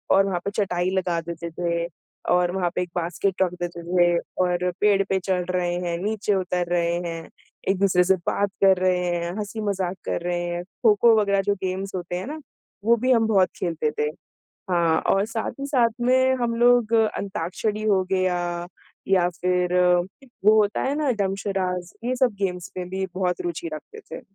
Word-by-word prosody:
और 195 0 +5
वहाँ 180 -3 -1
पे 200 - -1
चटाई 185 -3 0
लगा 175 -2 0
देते 170 0 -6
थे 170 0 -1 0.5
और 180 0 +3
वहाँ 180 -2 +1
पे - - +1
एक 180 - -4
बास्केट 180 +2 -1
रख 180 -2 +2
देते 175 -1 -4
थे 175 -1 +4 0.3
और 180 0 0
पेड़ 205 -1 +4
पे 190 0 +2
चढ़ 180 -1 -1
रहे 180 -1 0
हैं, 175 -1 -2
नीचे 210 -1 0
उतर 180 -2 -1
रहे 170 -1 +1
हैं, 165 -1 -6 0.4
एक 195 - +2
दूसरे 180 -2 +4
से 190 +1 +4
बात 200 0 +1
कर 190 -1 +6
रहे 180 -1 +1
हैं, 170 0 -2
हँसी-मज़ाक 200 -3 -2
कर - - -2
रहे 175 -1 -1
हैं। 175 0 -3 0.2
खो-खो 225 +1 +6
वग़ैरह 200 -1 +2
जो 205 +1 +1
गेम्स 190 +1 -3
होते 175 -1 -4
हैं 185 - -4
ना, 305 +2 -5 0.5
वो 235 +1 +6
भी 255 +3 +2
हम 225 -2 +4
बहुत 195 -4 +3
खेलते 165 -3 -1
थे। 150 - +2 0.6
हाँ, 170 -2 +3
और 195 +1 +2
साथ 225 0 -3
ही 275 - -3
साथ 250 -5 +3
में 260 +1 +3
हम 235 -1 0
लोग 240 -2 +4
अंताक्षरी 210 -1 -1
हो 190 -2 +3
गया 185 -1 +2 0.7
या 185 -2 +3
फिर 180 0 +1 0.7
वो 215 +1 +7
होता 205 0 0
है 275 +2 0
ना 295 -3 +1
डम्ब 195 -3 -1
शराड्स, 180 -3 -2
ये 250 +2 0
सब 250 -3 +2
गेम्स 180 -3 -2
में 180 -1 -4
भी 190 +1 -2
बहुत 180 -1 -1
रूचि 170 -1 -4
रखते 285 - -9
थे। - - -6
185 Hz, 190 wpm, -24 LUFS, 175-210 Hz, 0.7 s, वो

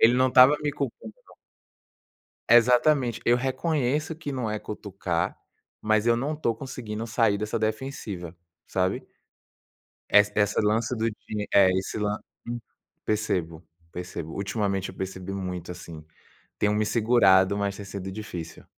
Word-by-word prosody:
Ele 115 +2 +6
não 130 +1 +4
estava 130 +3 +7
me 145 - 0
culpando 125 -6 -5
não. - - -20 1.2
Exatamente. 125 +2 +4
Eu 120 +1 +4
reconheço 145 +3 -1
que 155 -3 -6
não 125 -5 -2
é 105 - -2
cutucar, 95 -5 -3 0.4
mas 110 +1 +1
eu 115 0 +4
não 145 +5 -2
tô 115 -7 -1
conseguindo 115 -4 -6
sair 110 -2 +2
dessa 105 +1 -2
defensiva, 110 -7 -4 0.3
sabe. 95 0 -1 1.0
Essa 105 0 +6
esse 105 0 +2
lance 110 +4 +1
do 110 - 0
di 105 -1 -5
eh, 100 -2 +7
esse 95 - -3
lan 105 0 0 0.3
Hum. 120 0 -3 0.5
Percebo, 85 -6 -1 0.3
percebo. 85 -2 -6
Ultimamente, 100 -1 -2
eu - - -11
percebi 95 0 -5
muito, 90 -2 -4
assim. 85 -3 -9 0.6
Tenho 105 0 +2
me 110 0 +1
segurado, 100 -4 +4
mas 100 -1 -1
tem 100 - -8
sido 95 -1 -6
difícil. 90 -6 -7
105 Hz, 145 wpm, -26 LUFS, 95-120 Hz, 1.2 s, estava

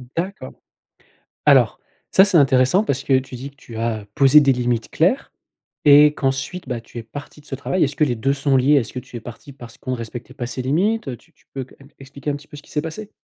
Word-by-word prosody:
D'accord. 190 +5 -4 0.9
Alors, - - +4 0.3
ça 190 - +7
c'est 190 -4 +3
intéressant 135 +6 +4
parce 140 -9 -2
que 135 - +3
tu 130 -1 -9
dis 130 +3 -7
que 140 - -31
tu 115 -5 -11
as 110 -2 -2
posé 140 +2 +7
des 140 -2 +4
limites 120 -2 -1
claires 185 - +1 0.5
et 150 +1 +8
qu'ensuite, 135 +6 -3
bah 120 -2 -3
tu 115 - -13
es - - -8
parti 145 +6 -10
de - - -27
ce 135 - -5
travail. 175 +6 0
Est-ce 140 0 -1
que 155 - +2
les 130 -5 +1
deux 135 +5 0
sont 140 -1 +1
liés? 135 +4 +4
Est-ce 125 -5 0
que 125 - -4
tu 120 - -10
es - - -6
parti 120 +6 -11
parce 120 -4 -13
qu'on 130 - -4
respectait 120 +2 -7
pas 125 -4 -4
ces 130 +1 -4
limites? 180 - 0
Heu, 125 -3 -4
tu 165 - -27
tu - - -32
peux 135 - -4
qu 130 - -18
m 140 - -16
expliquer 140 +2 -7
un 145 - -1
petit 145 +1 -11
peu - - -12
ce - - -10
qu'il - - -18
s'est 150 - -1
passé? 200 +6 -7
135 Hz, 255 wpm, -21 LUFS, 125-150 Hz, 0.9 s, et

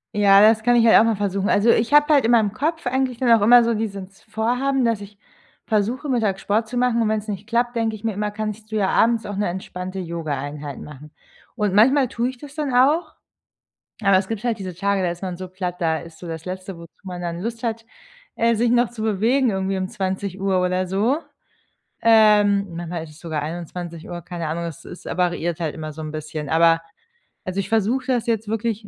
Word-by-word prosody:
Ja, 200 -1 +6
das 220 +1 +5
kann 245 +1 +4
ich 230 -1 +5
halt - - +8
auch - - +6
mal 225 -1 +2
versuchen. 200 -1 -1
Also 210 +3 +3
ich 230 +4 +2
habe 295 +1 +6
halt 280 -5 +4
in 230 - +3
meinem 220 -4 +4
Kopf 305 - -2
eigentlich 255 -1 -1
dann 250 -2 +2
auch 225 -3 +5
immer 240 +3 +7
so 230 0 +1
dieses 195 -3 -6
Vorhaben, 250 +5 0
dass 230 -3 +1
ich 200 0 -12 0.5
versuche, 230 +7 -1
mittags 215 -7 0
Sport 220 +2 0
zu 245 +3 -5
machen, 245 -1 +2
und 215 - 0
wenn's 215 0 -2
nicht 205 -1 -5
klappt, 240 +1 0
denke 225 -1 0
ich 210 - -13
mir 225 -1 -1
immer, 210 +1 -2
kannst 215 +1 -6
du - - -3
ja 195 -2 +2
abends 230 -1 +2
auch 205 - -5
'ne 205 - 0
entspannte 185 +1 -6
Yoga-Einheit 150 -4 -5
machen. 150 +1 -11 0.4
Und 210 -4 0
manchmal 260 +5 +5
tue 240 +1 -2
ich 260 -1 -10
das 290 0 -11
dann 295 -5 -2
auch. 305 +6 +3 0.9
Aber 195 -3 +4
es 190 0 0
gibt 225 0 -4
halt 235 -3 0
diese 185 -3 -6
Tage, 200 +1 0
da 175 - 0
ist 175 +2 -7
man 180 -2 -4
so 185 0 -7
platt, 180 -1 -5
da 160 -2 +1
ist 165 -1 -12
so 175 - -8
das 165 -1 -6
letzte, 185 0 -6
wozu 170 0 -13
man 180 -2 -7
dann 170 -1 -4
Lust 230 +4 -5
hat, 225 -1 -3 0.5
äh, 230 0 +2
sich 230 +2 +1
noch 240 0 +3
zu 235 -2 -7
bewegen 225 +5 +2
irgendwie 190 -1 -1
um 185 0 -2
20:00 190 -1 -2
oder 185 0 0
so. 210 - +1 0.8
Ähm, 210 -3 +5
manchmal 170 -1 -5
ist 155 - -12
es 150 - -16
sogar 160 -3 -3
21:00, 170 +1 -6
keine 170 -1 -5
Ahnung, 165 +2 -3
es 170 0 -7
ist 175 - -11
variiert 175 -2 -1
halt 160 -4 -3
immer 155 -1 -6
so 155 - -10
'n 155 0 -6
bisschen, 155 -1 -6
aber 165 0 +4 0.7
also 185 +1 -3
ich 195 - -2
versuche 225 +4 0
das 245 -3 0
jetzt 225 -3 -1
wirklich, 220 -1 -2
205 Hz, 220 wpm, -22 LUFS, 180-230 Hz, 0.9 s, halt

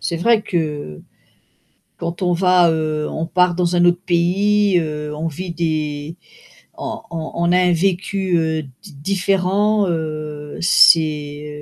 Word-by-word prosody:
c'est 170 - -2
vrai 215 +5 +2
que, 175 - -4
heu, 150 - -5 1.0
quand 170 +2 -5
on 180 -1 +1
va, 180 -1 +4
heu, 155 -1 -2
on 160 +1 -3
part 180 0 +2
dans 175 0 0
un 175 - +4
autre 175 0 +3
pays, 195 +3 +2
heu, 150 -1 -5
on 160 +2 -3
vit 175 +4 -6
des 155 -2 -3 0.6
on - - -5
on 160 -1 -5
on 170 +1 +1
a - - +4
un 180 -1 +3
vécu, 190 +1 0
heu, 160 -1 -1 0.2
di 185 -7 -13
différent, 195 +4 +1
heu, 155 -2 -5
c'est, 150 -4 +3
170 Hz, 150 wpm, -19 LUFS, 155-180 Hz, 1.0 s, va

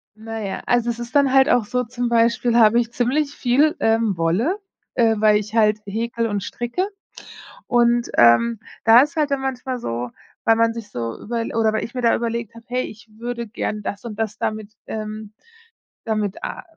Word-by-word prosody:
Na 225 +1 -7
ja, 195 -2 -4
also, 240 -1 +2
es 235 - -3
ist 240 +3 -8
dann 275 -2 +4
halt 270 0 +5
auch 240 -4 +3
so, 250 +3 -1
zum 245 0 -3
Beispiel 235 0 +2
habe 230 0 +6
ich 235 -1 -2
ziemlich 275 +5 0
viel, 280 +4 +2
ähm, 225 -4 +1
Wolle, 215 - +1 0.4
äh, 225 -3 +3
weil 210 0 +4
ich 210 +1 -5
halt 215 -1 +3
häkle 230 +2 -2
und 205 -2 -2
stricke. 240 +10 -2 0.8
Und, 240 0 +2
ähm, 195 - +5 0.2
da 230 +2 +8
ist 295 +3 -1
halt 300 -2 +1
dann 275 - 0
manchmal 260 -1 -3
so, 120 - -4 0.4
weil 225 - +5
man 230 0 +2
sich 230 -3 -8
so 115 - -5
überl 230 0 -3
oder 220 -1 +2
weil 220 - -1
ich 235 - -7
mir 250 - -3
da 230 - +4
überlegt 230 -1 -3
habe: 230 +1 -13
„Hey, 250 +1 -1
ich 220 +2 -12
würde 235 0 -4
gern 210 -1 -4
das 205 +4 -5
und 220 -2 -6
das 220 -1 -2
damit, 215 -1 -3 0.2
ähm 215 -1 -6 0.7
damit 215 -3 -2
a - - -5
230 Hz, 195 wpm, -21 LUFS, 215-245 Hz, 0.8 s, da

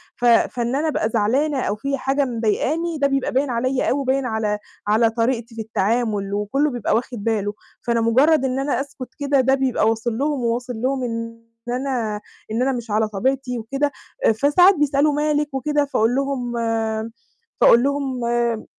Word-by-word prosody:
ف 245 - -3
فإن 240 +1 +2
أنا 305 +3 0
أبقى 225 -7 0
زعلانة 260 +7 +1
أو 205 - -1
في 275 +6 -2
حاجة 275 +2 0
مضايقاني 260 +8 -1
ده 280 -1 +2
بيبقى 275 -1 -1
باين 270 +2 +1
عليَّ 255 +2 0
أوي 275 - +1
وباين 270 0 0
على 220 -3 -1 0.3
على 225 +2 +4
طريقتي 230 0 -1
في 225 - -4
التعامل، 215 -1 -1
وكلّه 210 +9 0
بيبقى 240 -3 0
واخد 235 -2 -3
باله. 210 -2 0 0.3
فأنا 235 -1 0
مُجرّد 265 +6 +4
إن 260 0 -1
أنا 275 -2 0
أسكت 275 -3 -8
كده 280 -1 +2
ده 265 +1 +3
بيبقى 260 -5 +1
واصل 225 0 -2
لهم، 290 +1 0
وواصل 245 +2 -1
لهم 260 0 0
إن 230 -1 -5 0.3
أنا 245 -5 -2 0.3
إن 225 +3 -1
أنا 265 +1 +2
مش 240 -3 -5
على 215 +1 +2
طبيعتي 250 +4 -1
وكده. 275 +6 -1 0.3
آآ - - +6
فساعات 295 - +5
بيسألوا 290 -1 +2
مالِك 295 -1 0
وكده، 290 +2 0
فأقول 235 -3 +1
لهم 270 -3 -2 1.1
فأقول 235 +1 +7
لهم 270 -3 -1
آمم 235 -1 0
250 Hz, 175 wpm, -21 LUFS, 230-275 Hz, 1.1 s, فأقول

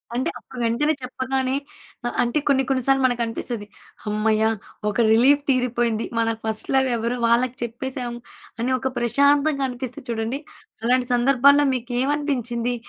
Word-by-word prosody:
అంటే 260 +7 0
అప్పుడు 255 - -11
వెంటనే 255 +7 +1
చెప్పగానే 260 +1 -2 0.5
అ - - 0
అంటే 240 +5 0
కొన్ని 270 -2 +3
కొన్ని 260 -2 +1
సార్లు 270 0 +4
మనకనిపిస్తది. 235 -2 -2 0.4
"హమ్మయ్య! 215 +1 +1 0.5
ఒక 210 - -4
రిలీఫ్ 265 +6 +5
తీరిపోయింది. 240 -3 +1
మన 230 - +2 0.2
ఫస్ట్ 220 -1 -2
లవ్ 265 0 +3
ఎవరో 235 +2 -2
వాళ్ళకి 240 +2 +2
చెప్పేసాము" 240 0 -4 0.4
అని 245 +3 0
ఒక 265 - -1
ప్రశాంతంగా 280 +4 +2
అనిపిస్తది 250 +2 -6
చూడండి. 230 +3 -2 0.4
అలాంటి 250 +1 +2
సందర్భాల్లో 275 +3 +5
మీకు 250 0 -4
ఏమనిపించింది? 250 -4 -1
250 Hz, 135 wpm, -23 LUFS, 235-270 Hz, 0.5 s, రిలీఫ్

